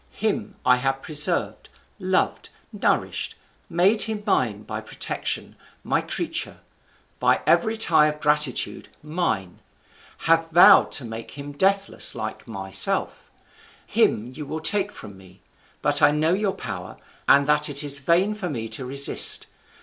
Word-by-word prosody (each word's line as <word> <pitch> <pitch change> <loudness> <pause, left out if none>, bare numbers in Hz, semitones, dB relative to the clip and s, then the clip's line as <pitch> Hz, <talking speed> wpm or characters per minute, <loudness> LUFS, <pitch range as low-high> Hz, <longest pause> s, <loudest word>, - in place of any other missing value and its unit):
Him 215 -1 -2
I 125 - +5
have 135 +1 -2
preserved, 150 -1 0 0.3
loved, - - -1 0.2
nourished; - - -1 0.3
made 195 +6 +2
him 215 -1 +1
mine - - 0
by - - -6
protection, - - -4 0.3
my - - 0
creature; - - -3 0.6
by - - +1
every 225 -1 +2
tie 160 -8 +4
of 150 0 -4
gratitude, 150 -3 0
mine; 150 - -3 0.7
have 165 0 +2
vowed 170 +2 +6
to 130 - 0
make 115 +4 -9
him 145 0 -8
deathless 195 +6 +1
like 110 0 -7
myself; 95 -4 -1 0.6
him 120 +4 0
you 150 - -7
will 155 +2 -5
take 205 +4 0
from 100 - -12
me. 95 0 -19 0.4
But 145 0 +3
I 145 - +6
know 155 +3 +1
your 200 0 -1
power, 90 - -7 0.3
and 140 0 +5
that 150 +1 +2
it 145 +1 0
is 145 -1 0
vain 175 +9 +1
for 200 -4 -5
me 115 -6 -5
to 110 +4 -3
resist. 140 +2 +4
150 Hz, 140 wpm, -23 LUFS, 125-180 Hz, 0.7 s, vowed